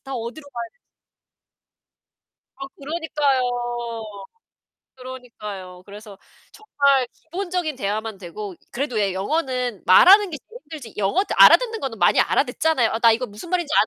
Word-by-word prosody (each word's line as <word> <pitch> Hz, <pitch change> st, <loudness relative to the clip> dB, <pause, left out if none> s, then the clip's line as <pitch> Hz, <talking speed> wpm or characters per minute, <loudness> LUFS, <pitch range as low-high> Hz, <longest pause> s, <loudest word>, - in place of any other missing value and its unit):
나 270 Hz, -1 st, -6 dB
어디로 240 Hz, +6 st, -6 dB
가야 240 Hz, -4 st, -6 dB
되지?' -, -, -42 dB, 1.9 s
아 275 Hz, -, -7 dB
그러니까요. 295 Hz, -3 st, -1 dB, 1.5 s
그러니까요. 210 Hz, -8 st, -9 dB
그래서 205 Hz, 0 st, -12 dB, 0.3 s
정말 280 Hz, -, +1 dB
기본적인 350 Hz, -2 st, -4 dB
대화만 215 Hz, -2 st, -3 dB
되고 190 Hz, +2 st, -8 dB, 0.2 s
그래도 250 Hz, -3 st, -2 dB
예 200 Hz, -2 st, 0 dB
영어는 250 Hz, -, -2 dB
말하는 380 Hz, -, +7 dB
게 300 Hz, -, -5 dB
제일 480 Hz, +2 st, -12 dB
힘들지 285 Hz, -9 st, -10 dB
영어 205 Hz, -, +1 dB, 0.2 s
알아듣는 455 Hz, -3 st, +6 dB
거는 250 Hz, -, -5 dB
많이 -, -, +4 dB
알아듣잖아요. 310 Hz, -8 st, +1 dB
아 225 Hz, -, -2 dB
나 230 Hz, 0 st, +6 dB
이거 235 Hz, +3 st, 0 dB
무슨 210 Hz, +11 st, -11 dB
말인지 345 Hz, -4 st, -1 dB
255 Hz, 320 characters per minute, -22 LUFS, 210-315 Hz, 1.9 s, 말하는